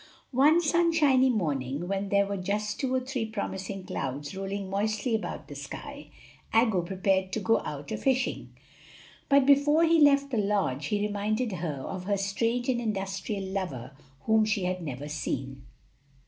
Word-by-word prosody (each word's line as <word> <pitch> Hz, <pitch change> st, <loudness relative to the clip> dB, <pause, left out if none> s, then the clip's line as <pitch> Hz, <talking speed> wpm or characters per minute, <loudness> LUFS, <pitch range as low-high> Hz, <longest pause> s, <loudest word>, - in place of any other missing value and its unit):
One 295 Hz, +6 st, +5 dB
sunshiny 310 Hz, -5 st, +3 dB
morning, 150 Hz, -, -1 dB
when 195 Hz, +1 st, -2 dB
there 200 Hz, 0 st, +3 dB
were 200 Hz, 0 st, -3 dB
just 205 Hz, +3 st, -2 dB
two 265 Hz, -2 st, -1 dB
or 260 Hz, -, +1 dB
three 255 Hz, -2 st, -3 dB
promising 195 Hz, -3 st, -4 dB
clouds 145 Hz, 0 st, -4 dB
rolling 195 Hz, 0 st, -4 dB
moistly 215 Hz, +4 st, -1 dB
about 220 Hz, -, -3 dB
the -, -, -8 dB
sky, -, -, -8 dB, 0.4 s
Aggo 225 Hz, -5 st, +3 dB
prepared 190 Hz, +1 st, 0 dB
to -, -, 0 dB
go 225 Hz, +2 st, +2 dB
out 145 Hz, -1 st, -7 dB
a -, -, -1 dB
fishing; 260 Hz, -1 st, 0 dB, 0.8 s
but 280 Hz, -2 st, +5 dB
before 285 Hz, +3 st, +5 dB
he 330 Hz, -1 st, +4 dB
left 280 Hz, -1 st, +5 dB
the 240 Hz, -, 0 dB
lodge 195 Hz, -10 st, 0 dB
he 205 Hz, +2 st, 0 dB
reminded 210 Hz, +3 st, -1 dB
her 155 Hz, -7 st, -4 dB
of 185 Hz, -1 st, -5 dB
her 200 Hz, 0 st, +1 dB
strange 230 Hz, +5 st, -1 dB
and 245 Hz, -2 st, +1 dB
industrious 195 Hz, -2 st, -3 dB
lover, 140 Hz, -10 st, -4 dB, 0.3 s
whom 220 Hz, +4 st, +3 dB
she 215 Hz, -2 st, 0 dB
had 180 Hz, 0 st, -1 dB
never 145 Hz, -2 st, -5 dB
seen. 135 Hz, -3 st, -4 dB
200 Hz, 160 wpm, -28 LUFS, 185-245 Hz, 0.8 s, One